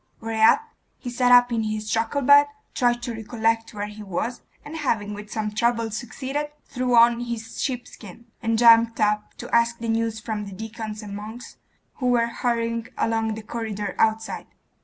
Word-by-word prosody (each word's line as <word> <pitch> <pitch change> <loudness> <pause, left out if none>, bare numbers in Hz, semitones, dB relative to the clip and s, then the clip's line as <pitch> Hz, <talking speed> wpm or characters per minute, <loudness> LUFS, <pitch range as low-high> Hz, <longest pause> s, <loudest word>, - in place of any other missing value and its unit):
Whereat 225 - +3 0.3
he 245 - -6
sat 245 0 +2
up 245 0 +7
in 230 - +1
his 215 0 -3
truckle 230 +5 0
bed, 285 +2 +7 0.3
tried 240 -3 +1
to 240 - -3
recollect 225 0 -1
where 205 0 -3
he 210 +1 -9
was, 210 +5 -3 0.2
and 305 +2 -7
having 215 -8 -1
with 205 0 -9
some 215 -1 -2
trouble 230 +1 0
succeeded, 260 +6 -4 0.2
threw 250 -1 0
on 235 0 +6
his 235 -2 -5
sheepskin, 235 -4 -6 0.2
and 225 -1 +1
jumped 230 0 +6
up 210 0 0
to - - -3
ask 235 0 +3
the 230 0 -4
news 225 0 0
from 215 -2 -4
the 200 - -8
deacons 220 +1 -6
and 200 -1 -7
monks 220 +4 -9 0.4
who 255 - -1
were 240 -1 +3
hurrying 230 -1 -1
along 225 -1 0
the 220 - -8
corridor 210 -3 -4
outside.... 220 0 0
230 Hz, 175 wpm, -24 LUFS, 215-240 Hz, 0.4 s, up